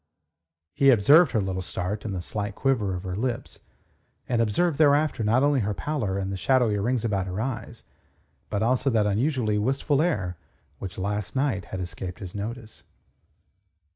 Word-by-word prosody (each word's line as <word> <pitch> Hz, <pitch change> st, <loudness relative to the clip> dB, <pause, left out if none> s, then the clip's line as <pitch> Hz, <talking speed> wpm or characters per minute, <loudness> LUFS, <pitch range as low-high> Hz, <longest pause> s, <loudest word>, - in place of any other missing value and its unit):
He 140 Hz, +5 st, +4 dB
observed 140 Hz, -, +6 dB
her 110 Hz, -, +2 dB
little 95 Hz, -1 st, -2 dB
start 90 Hz, +4 st, -4 dB
and 100 Hz, -3 st, -3 dB
the 90 Hz, -, -4 dB
slight 100 Hz, 0 st, -4 dB
quiver 115 Hz, -9 st, 0 dB
of 90 Hz, -, -6 dB
her 90 Hz, -2 st, -4 dB
lips, 120 Hz, +3 st, -3 dB, 0.7 s
and 120 Hz, -2 st, +1 dB
observed 145 Hz, +9 st, +1 dB
thereafter 145 Hz, -4 st, +3 dB
not 115 Hz, +5 st, +3 dB
only 145 Hz, -1 st, +3 dB
her 105 Hz, -2 st, -1 dB
pallor 110 Hz, -, -2 dB
and 95 Hz, 0 st, -2 dB
the -, -, -3 dB
shadowy 115 Hz, 0 st, +2 dB
rings 120 Hz, +3 st, 0 dB
about 100 Hz, -4 st, -1 dB
her 95 Hz, +2 st, -4 dB
eyes, 115 Hz, -1 st, -4 dB, 0.7 s
but 105 Hz, +1 st, -1 dB
also 125 Hz, +3 st, +2 dB
that 110 Hz, -4 st, +2 dB
unusually 110 Hz, 0 st, +1 dB
wistful 135 Hz, +5 st, +1 dB
air 100 Hz, -, -1 dB, 0.4 s
which 95 Hz, -2 st, -7 dB
last 105 Hz, +2 st, -3 dB
night 130 Hz, -8 st, 0 dB
had 95 Hz, -, -6 dB
escaped 90 Hz, 0 st, -6 dB
his 95 Hz, -3 st, -8 dB
notice. 110 Hz, +2 st, -6 dB
110 Hz, 170 wpm, -26 LUFS, 95-130 Hz, 0.7 s, observed